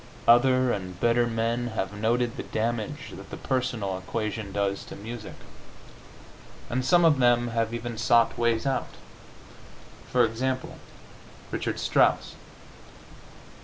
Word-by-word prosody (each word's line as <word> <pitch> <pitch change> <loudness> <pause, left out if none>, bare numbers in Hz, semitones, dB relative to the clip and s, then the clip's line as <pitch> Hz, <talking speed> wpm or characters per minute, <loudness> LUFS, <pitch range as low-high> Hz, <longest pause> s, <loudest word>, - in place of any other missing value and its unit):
Other 130 +1 +5
and 90 -3 -4
better 120 0 +3
men 115 +1 -1
have 95 - -2
noted 115 +3 0
the - - -4
damage 115 +6 -3
that - - -10
the - - -7
personal 120 -8 -2
equation 110 +1 -4
does 100 0 -1
to - - -9
music, 110 +1 -8 1.4
and 130 +2 0
some 175 +6 +4
of 150 -4 +4
them 120 -1 +3
have 115 -1 -1
even 120 -1 -5
sought 115 +1 +4
ways 115 0 +1
out. 135 -2 -1 1.2
For 125 -1 +4
example, 130 +3 -3 0.7
Richard - - -2
Strauss. - - +2
120 Hz, 125 wpm, -26 LUFS, 110-125 Hz, 1.4 s, Other